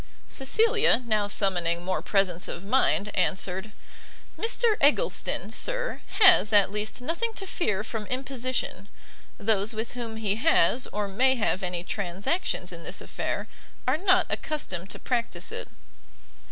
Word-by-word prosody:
Cecilia, 430 - +3
now, 215 -3 +1
summoning 175 -4 +1
more 185 0 -1
presence 185 -4 0
of 175 - -6
mind, 210 -2 +1
answered, 190 +2 -1 0.6
"Mr 460 0 +2
Eggleston, 300 - +2
sir, - - -1 0.2
has, 375 - +7
at 205 -2 +5
least, 210 +5 -3
nothing 435 - -2
to 390 - -5
fear 215 - -1
from 220 -2 -5
imposition: 255 -6 -3 0.5
those 210 +1 0
with 220 +1 -4
whom 235 -2 -6
he 215 -2 -1
has, 255 - +3
or 210 -1 -3
may 260 +7 +3
have 210 -4 0
any 180 -2 -3
transactions 195 - -2
in - - -9
this - - -6
affair, - - -4 0.4
are 255 - +3
not 370 +1 +3
accustomed 190 - -3
to - - -5
practice 240 -2 -2
it." - - -5
220 Hz, 140 wpm, -27 LUFS, 195-285 Hz, 0.6 s, has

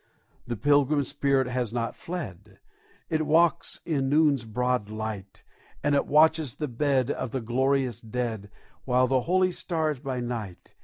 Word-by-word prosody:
The 120 -1 -3
Pilgrim 145 +2 +3
spirit 140 -1 +1
has 125 -2 -2
not 115 -1 -2
fled: 105 - -7 0.5
It 155 -1 0
walks 165 +2 +3
in 140 -5 0
noon's 145 -4 +3
broad 125 -1 -1
light; 110 -3 -6 0.4
And 145 - +2
it 140 - +2
watches 155 -3 +3
the 150 - -3
bed 135 +1 +1
of - - -3
the 130 - -3
glorious 130 0 0
dead, 110 -3 -4 0.4
With 125 0 +3
the 130 -1 +2
holy 185 +4 +2
stars 160 -5 -2
by 130 -2 -4
night. 115 -7 -6
130 Hz, 150 wpm, -27 LUFS, 115-150 Hz, 0.5 s, Pilgrim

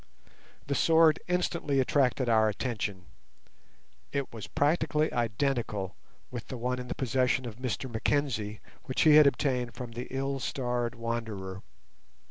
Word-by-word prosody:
The 140 - -1
sword 160 +3 +5
instantly 170 -5 0
attracted 130 -1 +2
our 110 -2 +4
attention; 105 -4 -3 1.1
it 140 -3 -3
was 110 -3 -7
practically 150 +1 +1
identical 115 -5 -1 0.4
with 120 -3 -6
the 130 - -5
one 125 +2 -1
in 125 - -6
the - - -4
possession 130 0 +1
of 115 -2 -7
Mr 130 +1 -3
Mackenzie 115 -3 -1 0.2
which 130 -4 -1
he 155 - +7
had 150 -2 +8
obtained 125 -4 0
from 125 -2 -6
the 120 +2 -6
ill 135 +1 -2
starred 125 -2 -2
wanderer. 110 -5 -4
125 Hz, 135 wpm, -29 LUFS, 115-140 Hz, 1.1 s, had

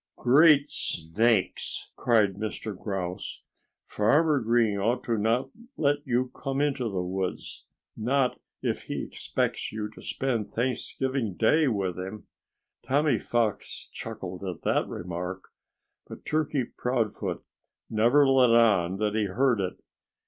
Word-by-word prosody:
"Great 145 +2 +6
snakes!" 100 - 0
cried 110 -5 +3
Mr. 105 +1 -5
Grouse. 95 -2 -5 0.4
"Farmer 145 +8 +3
Green 115 -3 +2
ought 120 +6 0
not 115 +2 +1
to 225 - -25 0.2
let 145 -1 +2
you 125 0 +1
come 135 +1 -4
into 140 -3 0
the 95 -3 -2
woods 95 +1 -4 0.3
not 125 +3 +1 0.2
if - - -2
he - - -3
expects - - -2
you 110 -1 -3
to - - -14
spend 120 -6 -2
Thanksgiving 130 -2 -2
Day 150 - +3
with 95 -7 -1
him!" 95 +3 -6 0.6
Tommy 145 +4 +2
Fox 115 -3 -1
chuckled 90 0 -6
at 90 -4 -5
that - - +1
remark. 90 +2 -5 0.6
But - - -11
Turkey 155 -3 0
Proudfoot 120 -2 -2 0.4
never 120 +6 +4
let 130 -2 +5
on 100 -6 +4
that 105 0 0
he 110 -1 +1
heard 115 +3 +2
it. 90 - -4
115 Hz, 125 wpm, -27 LUFS, 100-130 Hz, 0.6 s, Great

